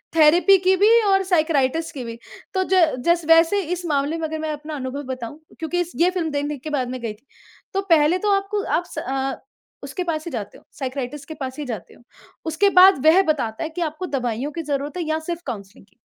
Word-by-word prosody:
Therapy 340 +5 +6
की 375 +1 +3
भी 405 +3 +4 0.2
और 390 0 +3
साइकियाट्रिस्ट 320 -4 +1
की 255 - -4
भी। 230 -1 -7 0.4
तो 375 -1 +1
ज - - +5 0.3
जस 340 -1 +3
वैसे 330 +5 +5
इस 355 0 -5
मामले 290 +2 0
में 320 - -2
अगर 315 0 -5
मैं 310 0 -2
अपना 300 +1 -7
अनुभव 270 +1 -5
बताऊँ 255 +3 -8 0.2
क्योंकि 330 +2 -2
इस 350 - -4
ये 355 - +5
फ़िल्म 340 -4 -2
दे 285 - -1
देखने 290 0 -3
के 310 - -7
बाद 260 -4 -1
मैं 255 0 -5
गई 230 -2 -3
थी। 220 +6 -25 0.5
तो 390 - +1
पहले 320 +2 +5
तो 415 - +3
आपको 395 +1 -2
आप 345 - 0
स - - -12
अ, 270 +1 -2 0.5
उसके 365 - -4
पास 315 -3 -3
ही 340 - -5
जाते 220 -5 -6
हो, - - -21
साइकियाट्रिस्ट 270 +1 -5
के 315 - -6
पास 265 -1 -6
ही - - -3
जाते 220 -9 -6
हो। - - -20 0.4
उसके 325 +6 +2
बाद 365 -6 +6
वह 340 +5 +7
बताता 245 -7 -1
है 320 - -3
कि 345 +2 -6
आपको 315 +2 -3
दवाइयों 255 -1 -2
की 330 +2 -4
ज़रूरत 290 +2 -3
है 350 - -1
या 315 0 -1
सिर्फ़ 340 +1 -5
काउंसलिंग 205 -6 -8
की। - - -34
310 Hz, 235 wpm, -22 LUFS, 270-345 Hz, 0.5 s, वह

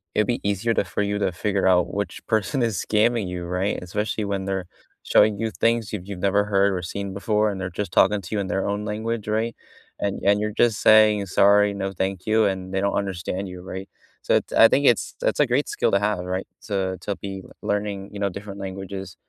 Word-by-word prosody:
it'd 105 -1 +2
be 120 - -1
easier 100 +3 0
to - - +1
for 95 +3 -3
you 100 0 -1
to 95 - +1
figure 95 +2 0
out 90 -2 +3
which 100 0 -4
person 110 +5 0
is 115 -6 0
scamming 110 -1 +2
you, 90 -1 -5
right, 90 +3 -1
especially 105 +4 -2
when 100 -1 -2
they're 95 -2 -2 0.4
showing 105 0 +4
you 110 -1 -1
things 115 -2 0
you've 95 -2 -5
you've 100 -3 -6
never 100 +2 +2
heard 100 -1 +2
or 90 - -2
seen 100 +3 -5
before, 105 +1 +1
and 95 -2 -4
they're 90 - -3
just 100 +4 -4
talking 105 -1 +4
to 95 +5 -5
you - - 0
in 95 - -4
their 95 +2 -1
own 100 +1 -2
language, 110 +1 -3
right, 110 +2 -1 0.4
and 100 -1 -2
and 100 +1 +4
you're 105 0 -1
just 115 -1 +2
saying, 105 -2 +6
"Sorry, 100 +2 +4
no, 95 0 -3
thank 95 0 -3
you," 110 0 +3
and 95 -1 -2
they 95 - 0
don't 100 - 0
understand 95 0 -3
you, 90 -1 -8
right, 95 +1 -7 0.4
so - - +2
it's - - 0
I 115 - +7
think 140 +4 +2
it's 120 - +2
it's - - 0
a - - +4
great - - +1
skill - - 0
to 100 - +3
have, 100 -3 -1
right, 95 +1 -3
so, 95 -3 -2
to 100 +1 -3
be 95 -1 -6
l - - -16 0.2
learning, 100 -1 -2
you 100 - -8
know, 100 - +1
different 100 +1 -8
languages, 95 -1 -6
100 Hz, 235 wpm, -23 LUFS, 95-105 Hz, 0.4 s, I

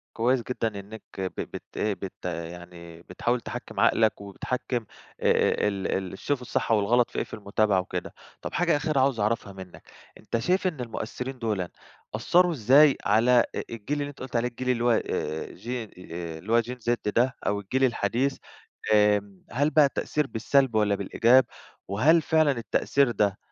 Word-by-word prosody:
كويس 120 +1 +2
جدًا 115 -5 -3
إنك 105 +3 -10 0.2
ب 95 -1 -3
بت - - -7
بت 100 -4 -3
يعني 85 0 -7
بتحاول 120 +6 -2
تحكم - - -7
عقلك 110 -2 +3
وبتحكم 120 +4 -3 0.4
آآ، - - +2
ال 100 -2 -2 0.3
ال 95 - -7
تشوف 145 -3 -2
الصح 120 - -2
والغلط 115 +3 +3
في - - -7
إيه - - 0
في - - -17
المتابعة 100 -1 +1
وكده، 90 - -5 0.3
طب - - -6
حاجة 170 -3 +2
أخيرة 145 -1 0
عاوز 130 -4 +2
أعرفها 105 -1 -1
منك، 95 -2 -12 0.3
أنت 115 - -3
شايف 185 +9 +1
إن 155 -8 -3
المؤثرين 125 +3 -5
دولًا 105 -6 -2 0.5
أثروا 180 0 +3
إزاي 135 +3 +5
على 120 +4 +4 0.2
الجيل 115 +6 -4
اللي 145 - -3
أنت 145 - -13
قلت 130 -1 -7
عليه، 120 +1 +2
الجيل 125 +1 -5
اللي 120 -1 +1
هو 120 - +4
آآ 80 -7 -2
Gen 120 -3 -5 0.5
اللي 100 +7 -7
هو 120 - +6
Gen 125 +2 -7
Z 120 - +4 0.2
ده 125 +2 +2
أو 100 0 +1
الجيل 130 +7 -1
الحديث 125 +3 +1 0.6
آآ، 105 -2 +2
هل 145 +5 +2
بقى 150 -1 +5
التأثير 150 +1 -1
بالسلب 130 +1 +1
والّا 105 -2 +3
بالإيجاب؟ 120 +6 +4 0.4
وهل 150 - +4
فعلًا 155 -2 +3
التأثير 130 +1 +1
ده 100 -2 +1
115 Hz, 165 wpm, -26 LUFS, 100-130 Hz, 0.6 s, هو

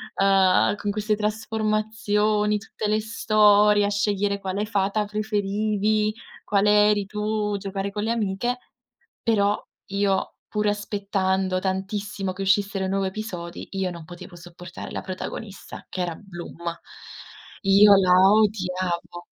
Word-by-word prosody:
uhm, 195 0 +4
con 205 0 -4
queste 210 +1 0
trasformazioni, 215 -1 0
tutte 210 0 -5
le 215 +1 +2
storie, 210 -2 +4
a - - 0
scegliere 205 -1 0
quale 195 +2 -2
fata 205 0 0
preferivi, 210 0 0 0.3
quale 210 +1 +4
eri 205 -1 +1
tu, 210 0 -2
giocare 195 0 -4
con 205 0 -4
le 225 - 0
amiche; 230 +3 -1 0.7
però 205 -2 +2 0.3
io, 200 -1 0
pur 210 0 -1
aspettando 195 -2 -1
tantissimo 195 +1 -3
che 195 - -5
uscissero 195 0 +1
i - - -2
nuovi 195 0 0
episodi, 185 -4 -7
io 190 -1 -1
non 170 -2 -9
potevo 175 +1 -11
sopportare 175 +1 -10
la - - -4
protagonista 195 +2 -7
che 185 - -3
era 170 -2 -3
Bloom. 175 -4 -10 1.0
Io 200 +1 +7
la 185 -2 +3 0.2
odiavo. 185 -5 0
205 Hz, 125 wpm, -24 LUFS, 190-210 Hz, 1.0 s, Io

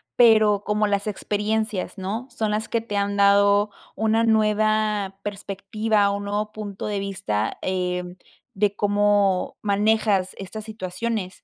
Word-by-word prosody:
pero 215 -4 +5
como 210 0 +1
las 200 +1 -1
experiencias, 210 -1 -2
¿no? 210 +7 -4
Son 215 -2 -2
las 215 +1 -2
que 230 - 0
te 210 -3 -4
han 200 0 0
dado 200 +1 +4 0.2
una 220 +1 +2
nueva 215 -2 +1
perspectiva, 205 +1 -1
un 200 0 -3
nuevo 210 +1 -2
punto 205 -2 -6
de 205 -1 -2
vista, 190 - -2
eh, 180 -1 -1 0.5
de 205 0 +1
cómo 205 -2 +2
manejas 205 -2 +1
estas 210 +3 -7
situaciones. 210 -1 -4
205 Hz, 130 wpm, -23 LUFS, 200-215 Hz, 0.5 s, pero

